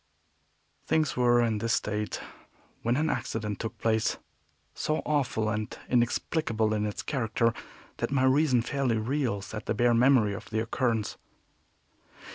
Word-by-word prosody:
Things 155 -3 +1
were 120 -1 +4
in 110 -2 0
this 115 +1 0
state 105 0 -1 0.6
when 120 +2 +1
an 155 +2 +1
accident 110 -6 -2
took 115 - -5
place 110 -1 +1 0.6
so 155 - -1
awful 135 -7 0
and 110 0 -3
inexplicable 120 -2 +1
in 105 0 0
its 105 - -5
character 115 -4 0 0.4
that - - -1
my 135 -1 +1
reason 130 -2 +4
fairly 130 -3 0
reels 115 -4 -2
at 110 - -6
the - - 0
bare 120 +2 +3
memory 120 -3 +4
of 110 +3 -8
the 110 - -1
occurrence. 115 -1 -1
115 Hz, 140 wpm, -28 LUFS, 110-130 Hz, 0.6 s, were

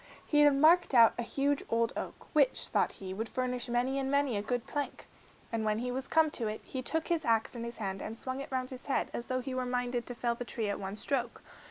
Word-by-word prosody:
He 295 - +2
had 290 -1 +6
marked 315 +1 +5
out 230 -2 +8
a - - +2
huge 280 +4 0
old 230 +1 +1
oak, - - -4 0.2
which, - - +2
thought - - +1
he, 190 -1 -7
would 220 +3 -4
furnish 250 -1 -2
many 250 +3 +1
and 270 0 -1
many 280 -3 +2
a 200 - 0
good 245 +2 -2
plank. 290 -1 -4 0.5
And 225 -1 -1
when 215 0 +1
he 250 +2 -2
was 265 +1 -3
come 320 -1 +4
to 230 -6 -2
it, 215 0 -4
he 260 - -5
took 320 +5 -1
his 335 -2 +1
axe 225 -4 +2
in 235 -2 -5
his 235 0 -6
hand 195 -3 -3
and 225 - -5
swung 260 +2 -4
it 275 - -7
round 255 0 -2
his 255 +1 -8
head 275 - 0
as 240 - -4
though 255 0 -1
he 260 +1 -5
were 255 0 -1
minded 245 -1 -1
to 245 - -5
fell 235 0 0
the 235 - -5
tree 225 -3 -2
at 200 - -2
one 195 +1 -4
stroke. 245 +1 -2
250 Hz, 260 wpm, -31 LUFS, 230-275 Hz, 0.5 s, out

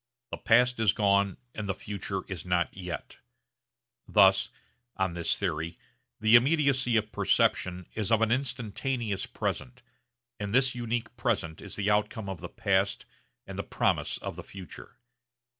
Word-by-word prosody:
The - - -3
past 125 +1 +3
is 110 -4 +4
gone 100 -2 +2 0.2
and 105 -2 -5
the 95 - 0
future 100 -1 -4
is 95 -4 -5
not 90 -1 0
yet. 90 -2 -7 0.9
Thus - - +5 0.5
(on 95 -3 0
this 85 -1 0
theory) 85 -3 -3 0.4
the 110 +1 +3
immediacy 130 -2 +4
of 110 0 -1
perception 90 0 +1
is 110 0 -2
of 115 0 +4
an 115 - +1
instantaneous 120 -4 -1
present, 125 0 -4 0.6
and 105 +2 -2
this 130 0 +4
unique 120 -1 -3
present 100 -10 -1
is - - -9
the 105 0 0
outcome 105 0 0
of 95 -5 -6
the - - -6
past 100 0 0 0.4
and - - -7
the - - -1
promise - - 0
of - - -6
the - - -8
future. 95 -4 -11
105 Hz, 150 wpm, -29 LUFS, 95-120 Hz, 0.9 s, Thus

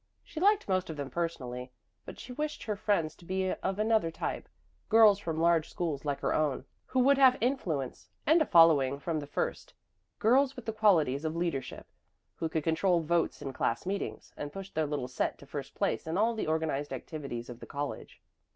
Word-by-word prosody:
She 315 - -8
liked 410 +3 +3
most 185 -2 0
of 160 - -5
them 140 -1 -5
personally, 125 -7 -4 0.3
but - - -9
she 250 - -8
wished 300 +3 -3
her 210 - -2
friends 200 -7 0
to - - -17
be 185 +1 -1
of 190 0 -2
another 215 -4 +2
type 165 - -4 0.4
girls 220 -3 +7
from 165 -5 -3
large 165 -1 +3
schools 155 -5 -3
like 145 -1 -2
her - - +1
own, 150 -4 0 0.2
who 260 - +1
would 275 +2 +4
have 260 -1 +7
influence 180 - -2 0.2
and 320 +3 +5
a 310 - +2
following 150 -6 +5
from 155 +2 -2
the 145 - -7
first; - - -3 0.4
girls 260 +5 +3
with 250 - -9
the 225 - -2
qualities 165 -10 +3
of 160 0 -2
leadership, 170 -6 -3 0.5
who 165 - -3
could 160 -2 -1
control 170 +2 +2
votes 170 +1 0
in 135 - -5
class 115 - -1
meetings 195 +2 -4
and 145 0 -6
push 195 +2 -8
their 155 -1 0
little 145 -4 -2
set 125 - -2
to - - -14
first - - -7
place - - -1
in 160 +3 -1
all 225 +3 +3
the 220 - -3
organized 155 -3 -1
activities 135 -3 -6
of 120 -1 -9
the - - -10
college. 145 0 -6
165 Hz, 200 wpm, -30 LUFS, 145-215 Hz, 0.5 s, girls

